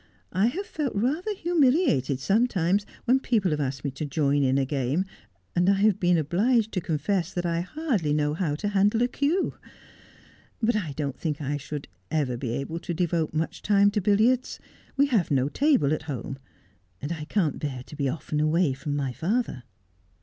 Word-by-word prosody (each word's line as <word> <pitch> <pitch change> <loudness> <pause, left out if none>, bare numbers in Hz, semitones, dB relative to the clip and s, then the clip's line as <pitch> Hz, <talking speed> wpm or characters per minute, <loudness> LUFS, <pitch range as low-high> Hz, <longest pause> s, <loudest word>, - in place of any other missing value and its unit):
I 195 +4 +3
have 370 +11 -2
felt 300 - -3
rather 305 - 0
humiliated 275 - +2
sometimes 200 - +1 0.2
when 255 +2 +4
people 215 -9 +1
have 150 - 0
asked 135 -1 -3
me 140 - -1
to 135 +4 -6
join 145 -1 +1
in 135 0 +2
a 135 - +2
game, 140 +6 0 0.5
and 180 +2 +3
I 200 - +5
have 205 0 +3
been 175 -2 +3
obliged 215 - +2
to 185 - -1
confess 170 +3 -1
that 175 -1 -3
I 170 0 0
hardly 220 - -1
know 150 0 +1
how 155 -3 -1
to 205 +7 -2
handle 205 +3 +3
a - - +3
cue. 290 +8 0 1.1
But 235 0 +2
I 175 -9 -2
don't 140 -2 -4
think 150 -3 -2
I 145 0 -2
should 145 0 -6 0.2
ever 145 -6 0
be 120 0 -4
able 140 +7 -3
to 170 0 -4
devote 170 -2 0
much 160 +1 -2
time 200 0 +4
to 210 - 0
billiards. 220 +6 +2 0.4
We 280 - +5
have 230 - +1
no 135 -1 +2
table 265 - +3
at 155 - -2
home; 135 0 -5 0.6
and 145 - -5
I 155 -3 -4
can't 165 -4 0
bear 130 -4 -4
to - - -11
be 140 -2 0
often 150 +1 -3
away 155 -1 +2
from 145 +2 -4
my 135 -3 -2
father.' 200 - -1
170 Hz, 190 wpm, -26 LUFS, 145-215 Hz, 1.1 s, I